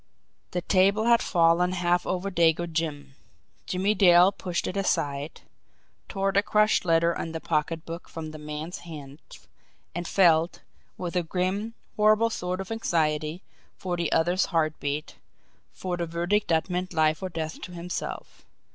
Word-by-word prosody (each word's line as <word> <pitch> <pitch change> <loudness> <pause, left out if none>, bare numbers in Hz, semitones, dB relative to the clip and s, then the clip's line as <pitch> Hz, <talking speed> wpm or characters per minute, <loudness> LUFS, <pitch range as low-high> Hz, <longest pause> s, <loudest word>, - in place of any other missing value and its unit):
The 180 - -3
table 200 +3 +3
had 235 0 +4
fallen 175 0 +3
half 175 -1 +1
over 185 +2 -2
Dago 170 -1 +3
Jim 155 -4 -3 0.5
Jimmie 190 +3 +1
Dale 180 -2 +6
pushed 180 -3 -3
it 185 - -4
aside, 150 -6 -1 0.7
tore 195 -1 0
the 200 0 +3
crushed 210 -1 +2
letter 170 0 +3
and 165 -1 -5
the - - -2
pocketbook 165 +2 -3
from 160 -1 -6
the 155 - -9
man's 150 +3 -6
hands 150 -4 -12 0.5
and 175 0 -4
felt, 170 -3 +3 0.4
with 180 -1 -5
a 180 - +3
grim, 190 +6 -2 0.2
horrible 215 +2 +4
sort 180 -2 -3
of 195 +2 -6
anxiety, 160 -5 -1 0.3
for 180 -2 -3
the 170 -2 -2
other's 175 +3 +2
heartbeat, 155 -3 -2 0.5
for 180 -1 -4
the 170 -1 -2
verdict 175 +5 0
that 160 +1 +1
meant 180 0 -3
life 155 +1 +2
or 190 - -3
death 160 -2 -5
to - - -7
himself. 175 0 -6
175 Hz, 150 wpm, -26 LUFS, 160-185 Hz, 0.7 s, Dale